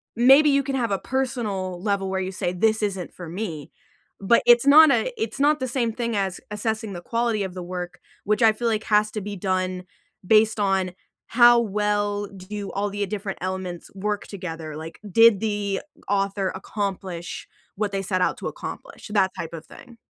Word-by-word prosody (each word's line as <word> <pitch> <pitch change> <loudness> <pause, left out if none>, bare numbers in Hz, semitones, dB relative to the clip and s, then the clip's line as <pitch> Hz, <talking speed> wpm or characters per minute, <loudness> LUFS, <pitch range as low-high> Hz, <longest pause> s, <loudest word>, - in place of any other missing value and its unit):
maybe 270 +6 +6
you 280 0 +3
can 275 0 -3
have 235 -5 -1
a 195 - +1
personal 215 -9 -2
level 200 -2 0
where 190 0 -1
you 185 0 -3
say, 180 -1 -2
"This 220 +4 +1
isn't 195 -4 -3
for 175 - -9
me," 165 -4 -5 0.5
but 215 +4 +4
it's 240 +1 +6
not 300 +2 +8
a - - +1
it's 225 +4 -3
not 300 +1 +4
the 260 - -2
same 240 -2 0
thing 235 0 -3
as 195 -3 -1
assessing 220 0 -3
the 175 - -7
quality 230 +1 -1
of 190 -2 -5
the 180 - -6
work, 180 0 -6 0.2
which 210 +3 0
I 225 -1 +6
feel 235 +2 -1
like 220 -1 -1
has 210 0 +3
to 215 - -4
be 205 +1 -5
done 185 -1 -2 0.4
based 220 +2 +4
on 190 -2 +1 0.4
how 240 0 +6
well 205 -1 0
do 200 +1 -7
all 205 +1 -1
the, 205 +1 -3
uh, - - -2
different 200 -1 -5
elements 185 -2 -5
work 205 +1 -2
together, 165 -6 -6
like, 160 +1 -9
did 225 0 +6
the 205 -3 -1 0.3
author 195 -1 0
accomplish 190 -3 -5 0.3
what 205 0 -1
they 195 -1 -2
set 185 -1 -1
out - - +1
to - - -5
accomplish? - - -8
That 190 -3 +3
type 165 - -5
of 165 -1 -8
thing. 240 +9 -15
205 Hz, 195 wpm, -24 LUFS, 185-225 Hz, 0.5 s, not